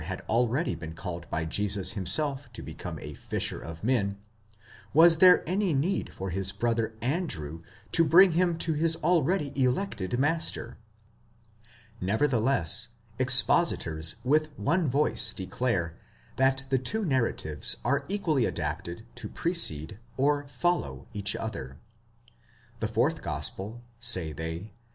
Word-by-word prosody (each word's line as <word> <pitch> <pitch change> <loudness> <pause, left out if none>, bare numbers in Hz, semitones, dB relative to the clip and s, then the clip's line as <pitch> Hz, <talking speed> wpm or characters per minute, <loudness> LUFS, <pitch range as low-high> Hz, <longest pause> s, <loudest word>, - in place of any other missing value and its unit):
had 90 +4 -6
already 125 +7 +1
been 80 -1 -8
called 85 -1 -7
by 80 - -2
Jesus 100 +3 +2
himself 140 - +2
to - - -8
become - - -7
a - - -7
fisher - - -3
of 80 +2 -9
men, 105 -5 0 0.8
was 165 +1 +7
there 180 0 +6
any 185 -2 0
need 165 +9 -1
for 95 -1 -6
his 95 +2 -2
brother 115 +1 -1
Andrew 120 - -3 0.3
to 165 - +4
bring 175 +4 +6
him 175 0 +1
to 165 0 -1
his 160 +2 +2
already 170 -3 +1
elected 125 - -1
master. 145 -4 -1 1.2
Nevertheless, 110 - +2 0.3
expositors 125 - +3
with 155 +4 +2
one 165 - 0
voice 140 +4 +2
declare 95 -4 -2 0.4
that 135 +1 +2
the 130 -1 +2
two 215 - -1
narratives 115 - +1
are 140 +3 0
equally 160 - 0
adapted 85 +6 -4
to - - -8
precede, 105 - +1 0.2
or 145 +1 +1
follow, 155 +7 -2
each 105 -1 0
other. 70 - -6 1.0
The 110 - -1
fourth 130 +8 0
gospel, 110 0 -3 0.2
say 95 -10 +3
they 80 +7 -6
125 Hz, 130 wpm, -27 LUFS, 95-155 Hz, 1.2 s, was